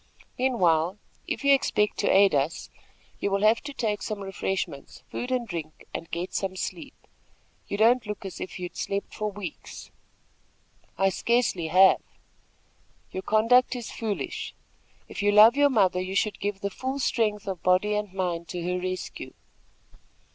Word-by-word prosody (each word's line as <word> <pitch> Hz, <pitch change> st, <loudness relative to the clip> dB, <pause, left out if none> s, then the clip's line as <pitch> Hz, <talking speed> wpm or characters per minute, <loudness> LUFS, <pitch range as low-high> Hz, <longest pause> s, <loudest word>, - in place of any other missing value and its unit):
Meanwhile, 185 Hz, -, +2 dB, 0.3 s
if -, -, -3 dB
you 280 Hz, 0 st, +6 dB
expect 210 Hz, -6 st, +1 dB
to -, -, +1 dB
aid 195 Hz, 0 st, +5 dB
us, 145 Hz, +3 st, -1 dB, 0.5 s
you -, -, 0 dB
will 200 Hz, +1 st, 0 dB
have 220 Hz, +2 st, +4 dB
to 290 Hz, -, -7 dB
take 220 Hz, -6 st, -2 dB
some 215 Hz, -1 st, -4 dB
refreshments, 195 Hz, -6 st, -4 dB
food 250 Hz, -, -4 dB
and 250 Hz, -2 st, 0 dB
drink, 160 Hz, -5 st, -7 dB
and 165 Hz, -, -6 dB
get 175 Hz, +2 st, -4 dB
some 190 Hz, -1 st, -2 dB
sleep. 190 Hz, -, -5 dB, 0.7 s
You 200 Hz, -, -3 dB
don't 230 Hz, +2 st, +4 dB
look 210 Hz, -1 st, -5 dB
as 190 Hz, -, -7 dB
if -, -, -6 dB
you 180 Hz, -, -4 dB
had 175 Hz, -, -9 dB
slept 200 Hz, 0 st, -3 dB
for 215 Hz, 0 st, -2 dB
weeks." 195 Hz, -5 st, -8 dB, 1.1 s
"I 195 Hz, +2 st, +3 dB
scarcely 195 Hz, -4 st, 0 dB
have." 185 Hz, +4 st, +6 dB, 1.1 s
"Your 190 Hz, -, -4 dB
conduct 230 Hz, +6 st, +3 dB
is 240 Hz, -2 st, -6 dB
foolish. 215 Hz, -3 st, -4 dB, 0.5 s
If -, -, -6 dB
you 205 Hz, 0 st, +3 dB
love 215 Hz, +4 st, +8 dB
your 285 Hz, 0 st, +5 dB
mother, 190 Hz, -7 st, +2 dB
you 185 Hz, +1 st, -4 dB
should 210 Hz, +1 st, 0 dB
give 200 Hz, 0 st, -3 dB
the 200 Hz, -, -2 dB
full 260 Hz, +6 st, -4 dB
strength 220 Hz, -6 st, 0 dB
of 190 Hz, -3 st, -4 dB
body 185 Hz, +3 st, +3 dB
and 210 Hz, -2 st, -2 dB
mind 175 Hz, -3 st, -2 dB
to 175 Hz, -1 st, -5 dB
her 180 Hz, +1 st, -1 dB
rescue." 185 Hz, 0 st, -5 dB
200 Hz, 165 wpm, -26 LUFS, 185-225 Hz, 1.1 s, love